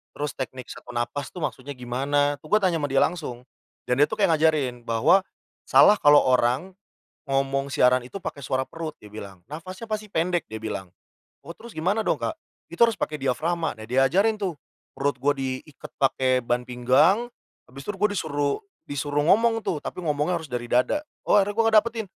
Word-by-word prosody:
terus 145 -1 -3
teknik 130 -1 -6
set - - -8
on 125 - -9
napas 135 +4 -2
tuh - - -5
maksudnya 135 0 -4
gimana?" 140 +4 0
Tuh - - -11
gue 210 - +5
tanya 175 -3 +2
sama - - +1
dia 135 - +3
langsung. 145 -8 -3 0.4
Dan 125 +1 +1
dia - - +3
tuh - - -4
kayak - - +4
ngajarin 145 -6 +1
bahwa, 155 +12 +4 0.4
"Salah 210 - +7
kalau 145 0 +7
orang, 130 +7 +2 0.6
ngomong 135 0 0
siaran 125 0 +3
itu 195 +9 -8
pake 165 - -5
suara 130 -1 -1
perut," 160 +2 -6
dia 105 - -13
bilang, 100 -4 -10
"nafasnya 185 +8 -8
pasti 215 0 -2
pendek." 175 -2 -1
dia 110 0 -8
bilang, 95 -4 -4 0.6
"Oh, 170 - -7
terus 230 +4 -13
gimana 190 +7 +1
dong - - 0
Kak?" - - -2 0.3
"Itu 170 - -9
harus 230 -3 +5
pake 150 -4 -3
diafragma." 160 +5 -1
Nah 110 - -9
diajarin 175 - +2
tuh 180 -6 -2 0.4
perut 140 +1 +1
gue 145 +2 +3
diiket 135 +2 -6
pake 130 -1 +2
ban 120 +1 -1
pinggang, 135 - +3 0.4
habis 135 +2 -11
itu 205 - -3
gue 210 +2 +1
disuruh 145 -3 -1 0.3
disuruh 145 +1 -1
ngomong 225 +8 +3
tuh, 170 - -2
tapi - - -5
ngomongnya 160 +2 0
harus 160 - -11
dari 120 -1 -3
dada. 125 - +1 0.2
Oh, - - +6
akhirnya 205 0 +2
gue 230 +2 +2
ngedapetin, 225 0 +2
145 Hz, 190 wpm, -25 LUFS, 130-180 Hz, 0.6 s, Salah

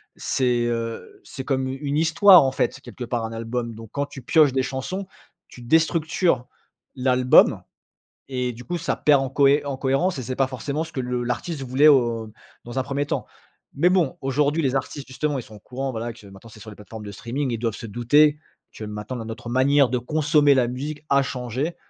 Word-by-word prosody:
C'est, 120 -2 0
heu, 115 -1 -4
c'est 130 - -8
comme 130 -1 -1
une 140 +2 -3
histoire 180 +3 +7
en 130 - +1
fait, 130 - -1
quelque 125 - -9
part 120 -1 -2
un 110 - -6
album. 115 +1 -4
Donc 110 0 -11
quand 140 0 -2
tu 140 -1 -11
pioches 145 +2 +4
des 130 - +1
chansons, 135 +9 -4 0.4
tu 125 - -13
déstructures 160 0 +1 0.5
l'album 125 -1 +4 0.7
et 125 -2 -2
du 120 - -11
coup 175 +5 -3
ça 165 - -2
perd 145 -2 +3
en 135 - -2
cohé 140 +1 +3
en 140 - -3
cohérence. 135 +5 0
Et - - -5
c'est 130 +2 -5
pas 135 - +2
forcément 140 +4 -4
ce 160 - -14
que 130 - -2
le 125 0 -2
l'artiste 135 +6 -3
voulait 135 +4 +4
au 115 -5 +2 0.3
dans 120 +2 -4
un - - 0
premier 140 +2 -2
temps. - - -3 0.5
Mais 170 +6 +3
bon, 180 -7 +1
aujourd'hui 145 +4 +1
les 135 -1 0
artistes, 135 +1 -3
justement, 140 +2 -2
ils 125 - -5
sont 110 - -14
au 105 - -13
courant 130 +4 -5
voilà 115 0 -4
que 115 -2 -16
maintenant, 95 +3 -14
c'est 110 0 -15
sur 110 - -10
les 105 - -11
plateformes 105 +1 -10
de 100 - -7
streaming. 120 +6 -3
Ils 115 - -2
doivent 115 -3 -2
se - - -8
douter 145 +7 +3 0.3
que 110 - -8
maintenant, 105 +4 -6
dans 115 - -6
notre 115 +1 -7
manière 135 +2 +3
de 125 - 0
consommer, 150 +3 +3
la 125 -2 +2
musique 145 +4 -5
a 140 0 +4
changé. 130 +5 -3
130 Hz, 215 wpm, -23 LUFS, 120-145 Hz, 0.7 s, histoire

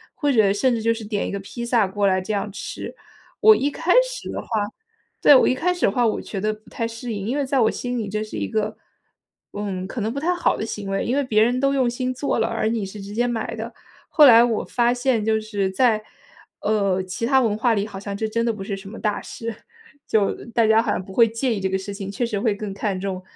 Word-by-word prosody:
或 290 - 0
者 215 -6 +4
甚 245 +5 +2
至 225 - -3
就 230 +1 +2
是 225 -1 -7
点 205 -1 -2
一 - - -4
个 200 - -3
披 215 +5 -7
萨 235 -4 +2
过 200 +1 -1
来 190 -1 +2
这 185 +3 -4
样 205 0 -2
吃。 200 - -7 0.5
我 435 0 +8
一 285 -4 0
开 350 +5 +1
始 - - -7
的 - - -4
话 - - -16 0.7
对， - - +8
我 - - +5
一 255 - +2
开 360 +7 +1
始 355 - 0
的 - - +3
话 240 +3 +1
我 220 - 0
觉 195 - -5
得 215 +1 0
不 215 +1 -16
太 230 - -3
适 230 +1 -6
应， 200 -1 -4
因 255 +5 -1
为 285 - 0
在 270 0 +1
我 220 - +3
心 245 0 -4
里 215 -4 -3
这 215 +1 -2
是 215 - -7
一 - - -2
个， 215 -1 -2 0.8
嗯， 195 -3 -4
可 240 - -6
能 220 +2 -1
不 - - -6
太 340 +5 +1
好 350 - +1
的 - - -3
行 210 -3 -5
为。 195 0 -1
因 240 - 0
为 - - +3
别 215 -3 +3
人 245 +2 +1
都 275 +1 +2
用 260 -3 +2
心 255 +1 -2
做 275 +2 -1
了， - - +2
而 225 -1 -1
你 225 -3 -1
是 195 +2 -8
直 200 +1 -8
接 240 +3 +1
买 235 -2 -3
的， - - -6 0.4
后 305 - +7
来 235 -4 +9
我 235 -3 0
发 240 0 +2
现 245 -3 0
就 220 0 +2
是 205 -3 -2
在， 220 +1 +2 0.6
呃， 200 -3 +1
其 185 +5 -4
它 265 +2 +4
文 215 -4 +1
化 230 +1 +2
里 205 -2 0
好 195 - -8
像 200 0 -5
这 220 - -1
真 230 +2 0
的 230 - +1
不 205 -2 -7
是 195 0 -4
什 195 0 -10
么 225 - -9
大 210 -2 -1
事。 230 0 -6 0.5
就 210 -3 +2 0.2
大 230 -1 +3
家 220 +1 +5
好 - - -3
像 - - -2
不 190 - -12
会 230 +3 +5
介 230 +3 -1
意 - - -3
这 190 - 0
个 190 - 0
事 190 +1 -6
情， 195 -1 -6
确 240 +5 -1
实 215 -4 -2
会 215 -1 +1
更 205 -1 -5
看 195 -1 -2
重 190 -1 -4
220 Hz, 295 characters per minute, -22 LUFS, 200-245 Hz, 0.8 s, 来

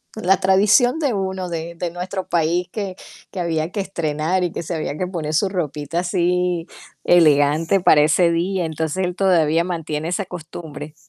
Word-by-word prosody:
la 195 -3 +2
tradición 210 +8 +4
de 290 -6 0
uno 190 -2 -3
de 170 0 -5
de 170 0 -4
nuestro 185 +2 -5
país, 170 +2 0
que 195 -4 -4 0.4
que 185 - -6
había 165 -1 -1
que 205 - -4
estrenar 170 -1 -1
y 175 - -1
que - - -5
se 170 - -5
había 155 -2 -3
que 185 - -1
poner 160 -4 -3
su 195 +6 +2
ropita 160 -4 -3
así, 180 -1 0 0.4
elegante, 155 +2 +4
para 155 -5 +5
ese 170 +3 +3
día, 175 +1 0
entonces 160 +3 -2
él 180 0 -3
todavía 170 -4 +3
mantiene 165 -3 -3
esa 190 +3 -2
costumbre. 160 -4 -9
175 Hz, 175 wpm, -21 LUFS, 160-185 Hz, 0.4 s, para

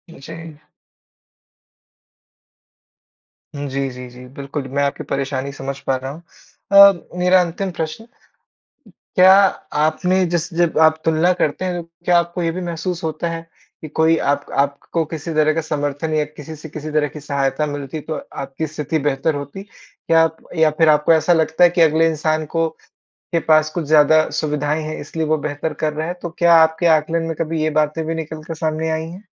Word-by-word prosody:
जी। 160 +2 -10 3.0
हुँ, 145 0 -4
जी, 135 0 -2
जी, 125 0 -9
जी, 125 +1 -13
बिल्कुल, 140 0 -5
मैं 140 +2 -1
आपकी 140 - -2
परेशानी 140 0 -2
समझ 135 0 -6
पा 135 - +2
रहा 130 +1 -5
हूँ। 155 +4 -11 0.5
अ, 200 0 +9 0.2
मेरा 180 +1 +4
अंतिम 180 +2 -3
प्रश्न, 165 +6 -5 1.1
क्या 185 +1 +8 0.5
आपने 185 +4 +1
जिस 175 0 -2
जब 170 -2 +1
आप 160 0 +4
तुलना 165 +3 +3
करते 175 0 -1
हैं 175 -2 -2
तो 165 - -20 0.2
क्या 175 -1 +4
आपको 170 +1 -2
ये 165 - 0
भी 185 - -5
महसूस 175 0 -4
होता 160 +2 -2
है, 165 0 -5 0.4
कि 155 - -7
कोई 160 +2 +2
आप 145 0 0
आपको 140 +4 0
किसी 160 +1 -6
तरह 155 0 +3
का 165 - 0
समर्थन 150 0 -3
या 155 -1 +2
किसी 150 +1 -10
से 155 +1 -10
किसी 155 +1 -7
तरह 150 -1 +1
की 150 +2 -10
सहायता 140 +1 -1
मिलती 145 +1 -5
तो 155 +2 -5 0.3
आपकी 135 +4 -4
स्थिति 155 +1 -3
बेहतर 145 +2 0
होती? 145 +7 -6
क्या 165 -5 -1
आप 160 0 -2 0.2
या 160 -1 +4
फिर 160 -1 +5
आपको 150 +1 +4
ऐसा 160 +2 +3
लगता 160 +1 +3
है 175 - +6
कि 175 0 -1
अगले 160 0 +4
इंसान 155 0 -1
को 165 0 +2 0.6
के 170 - +2
पास 155 -1 +3
कुछ 160 0 -4
ज़्यादा 155 +1 +4
सुविधाएँ 150 0 -1
हैं 155 0 -5
इसलिए 160 -1 -4
वो 155 0 +1
बेहतर 145 +2 -4
कर 155 +1 -2
रहे 155 +1 -3
हैं 175 - -4
तो 175 - -4
क्या 170 0 +5
आपके 160 +2 +2
आकलन 165 +2 -2
में 165 0 -3
कभी 165 -1 -2
ये 155 - +1
बातें 155 +2 -2
भी 165 +1 -2
निकल 160 -1 -6
कर 165 - -6
सामने 160 0 -2
आई 160 0 -2
हैं? 180 +4 -11
155 Hz, 190 wpm, -19 LUFS, 145-165 Hz, 3.0 s, अ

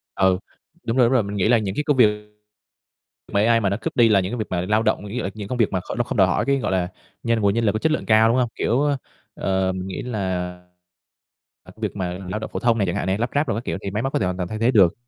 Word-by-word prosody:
Ừ, 95 -1 +3 0.5
đúng 115 +1 -1
rồi, 125 -2 +5
đúng 120 - +1
rồi, 130 -3 +4
mình 100 0 -5
nghĩ 100 +1 +2
là 120 0 +5
những 100 -3 -3
cái 150 - -2
công 145 - +2
việc 105 -3 +2 1.0
mà 100 - +1
AI 115 0 +4
mà 100 -3 +1
nó 100 - -1
cướp - - -4
đi 115 -2 +5
là 105 -2 +5
những 95 +1 -2
cái 120 - -3
việc 110 - -2
mà 90 -1 -1
lao 105 +5 +1
động, 105 - 0
ví 100 - -7
dụ 125 - -2
những 95 - -3
cái 105 -2 -6
công 125 - -3
việc 115 -4 +2
mà 95 - 0
kh 90 - -7
nó 120 - +2
không 120 - -5
đòi 95 -2 +5
hỏi 90 - 0
cái, 140 0 +2
gọi - - -2
là, 90 -2 +1 0.4
nhân 115 -1 +1
nguồn 100 -2 +2
nhân 115 +2 0
lực 105 - +4
có 110 - -2
chất 160 - +1
lượng 155 - -1
cao, 110 0 +5
đúng 120 - +2
hông? 125 -2 +1
Kiểu, 120 +4 +1
ơ, 145 -1 +1 0.4
ờ, 95 -1 0
mình 95 0 -5
nghĩ 95 - -5
là, 95 -6 -2 1.1
ờ, - - -14
việc 110 -2 -4
mà 90 -2 -3
lao 105 - -3
động 110 - -6
phổ - - -2
thông 120 -1 +2
này 100 -3 +1
chẳng 85 - -1
hạn - - -2
này, 95 +1 +1
lắp 115 +3 -1
ráp 145 +1 +2
đồ 115 - 0
các 115 - -4
kiểu - - -2
thì 100 - -3
máy 105 +3 -2
móc 135 - -2
có - - +1
thể 95 - 0
hoàn 90 0 -2
toàn 90 -1 -3
thay 110 - -4
thế 115 +3 +3
được. 95 -8 +5
105 Hz, 325 wpm, -22 LUFS, 95-120 Hz, 1.1 s, rồi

